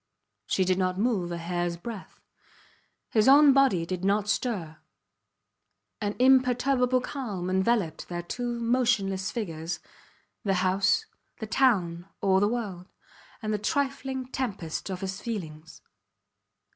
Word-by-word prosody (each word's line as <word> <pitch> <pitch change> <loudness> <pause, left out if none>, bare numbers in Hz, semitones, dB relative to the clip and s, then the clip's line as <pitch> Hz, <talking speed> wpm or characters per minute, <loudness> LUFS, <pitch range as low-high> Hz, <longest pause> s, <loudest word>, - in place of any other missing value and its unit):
She 190 - +1
did 185 0 +1
not 185 0 0
move 200 -5 0
a 170 - -3
hairs 175 0 -2
breadth; 210 +2 -8 0.9
his 215 0 +3
own 285 +1 +8
body 260 -11 +3
did 185 +1 -4
not 200 +1 +1
stir. 195 -8 -2 1.2
An 205 0 -2
imperturbable 255 0 +3
calm 210 -10 -4
enveloped 190 -3 0
their 175 -1 -4
two 240 +6 -3
motionless 230 -6 +1
figures, 170 -7 -4 0.6
the 195 -3 +1
house, 190 - +2 0.3
the 220 - -5
town, 195 -7 +1
all 190 -1 +3
the 205 - +3
world 205 -6 -4 0.6
and 215 0 -1
the 210 - -1
trifling 265 +2 -1
tempest 195 -10 -3
of 185 -1 -4
his 195 0 -4
feelings. 160 -9 -7
205 Hz, 125 wpm, -27 LUFS, 180-245 Hz, 1.2 s, own